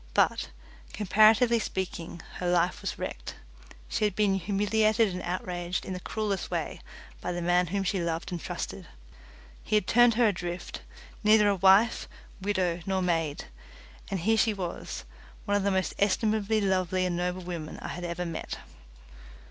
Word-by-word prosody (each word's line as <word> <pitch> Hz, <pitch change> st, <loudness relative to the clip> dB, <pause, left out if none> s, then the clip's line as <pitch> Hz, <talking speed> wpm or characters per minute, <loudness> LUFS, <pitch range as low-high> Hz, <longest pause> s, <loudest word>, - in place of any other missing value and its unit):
But, -, -, +2 dB, 0.4 s
comparatively 220 Hz, +3 st, +5 dB
speaking, 175 Hz, -5 st, -4 dB
her 180 Hz, -, -2 dB
life 180 Hz, +3 st, +2 dB
was 195 Hz, -, -3 dB
wrecked. -, -, -5 dB, 0.5 s
She -, -, -2 dB
had 205 Hz, -3 st, +1 dB
been 205 Hz, -2 st, +3 dB
humiliated 210 Hz, +3 st, +2 dB
and 180 Hz, -1 st, -5 dB
outraged 180 Hz, 0 st, -3 dB
in 190 Hz, -, -4 dB
the 180 Hz, -, -4 dB
cruellest 205 Hz, 0 st, -2 dB
way -, -, -3 dB, 0.4 s
by -, -, -2 dB
the 175 Hz, -, -3 dB
man 175 Hz, +1 st, +3 dB
whom 195 Hz, +3 st, -1 dB
she 190 Hz, -1 st, 0 dB
loved 170 Hz, +2 st, -2 dB
and 175 Hz, -2 st, -4 dB
trusted. -, -, -5 dB, 0.8 s
He -, -, 0 dB
had 210 Hz, -, +3 dB
turned 240 Hz, +2 st, +5 dB
her 235 Hz, -1 st, +4 dB
adrift, 175 Hz, -2 st, -5 dB, 0.4 s
neither 210 Hz, 0 st, +6 dB
a 200 Hz, -, +3 dB
wife, 195 Hz, +4 st, +4 dB, 0.3 s
widow, 185 Hz, -3 st, 0 dB
nor 190 Hz, -1 st, +1 dB
maid, 165 Hz, -4 st, 0 dB, 0.6 s
and 190 Hz, -3 st, -2 dB
here 220 Hz, +5 st, +3 dB
she 220 Hz, -1 st, +3 dB
was, 180 Hz, -3 st, -5 dB, 0.4 s
one 205 Hz, -, +1 dB
of 205 Hz, -, +2 dB
the 200 Hz, -, +1 dB
most 190 Hz, -1 st, 0 dB
estimably 215 Hz, +1 st, +2 dB
lovable 185 Hz, -1 st, +1 dB
and 180 Hz, -1 st, +1 dB
noble 180 Hz, +1 st, -2 dB
women 170 Hz, -3 st, -6 dB
I -, -, -6 dB
have 175 Hz, -, -6 dB
ever 175 Hz, +1 st, -3 dB
met. 165 Hz, -2 st, -5 dB
190 Hz, 165 wpm, -28 LUFS, 175-210 Hz, 0.8 s, neither